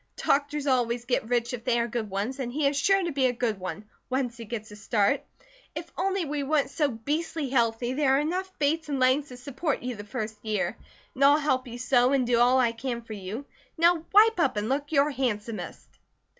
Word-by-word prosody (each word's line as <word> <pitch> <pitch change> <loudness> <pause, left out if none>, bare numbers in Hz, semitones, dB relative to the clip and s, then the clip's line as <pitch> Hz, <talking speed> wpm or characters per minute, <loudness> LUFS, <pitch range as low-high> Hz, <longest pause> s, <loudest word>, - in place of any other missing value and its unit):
Doctors 290 +1 0
always 245 -3 +1
get 240 -2 -1
rich 240 0 0
if 235 -2 -5
they 240 -1 +2
are 235 - 0
good 225 -2 -3
ones, 205 +8 -3
and 245 -2 -3
he 290 +3 -1
is 280 - 0
sure 390 +7 +3
to 340 - -1
be 270 -2 +2
a - - +1
good 235 -4 -2
one, 185 +3 -6 0.2
once 255 -2 -1
he 230 -1 -9
gets 215 -1 -6
a - - -9
start. 210 +4 +1 0.5
If - - -6
only 385 -2 0
we 295 0 -2
weren't 280 -1 +1
so 295 0 +1
beastly 290 +5 -3
healthy 240 -1 +1
there 270 -1 +3
are - - +3
enough 365 +5 -2
Bates 305 +2 0
and 280 -2 -1
Langs 260 +3 +3
to 250 - -10
support 275 +3 -3
you 250 -1 -3
for 205 - -7
the 205 - -15
first 215 -2 -5
year. 215 -3 -1 0.4
And 270 - -1
I'll 285 +1 +7
help 260 -4 0
you 240 0 -7
sew, 250 +1 +3
and 265 -2 +2
do 240 -1 +2
all 245 +2 +5
I 240 -2 +3
can 235 0 -4
for 225 - -8
you. 210 +6 -6 0.3
Now 335 0 +4
wipe 430 0 +6
up 270 -9 +2
and 210 +2 -1
look 285 +2 -1
your 290 -1 +3
handsomest!" 230 -5 -3
255 Hz, 225 wpm, -27 LUFS, 235-290 Hz, 0.5 s, I'll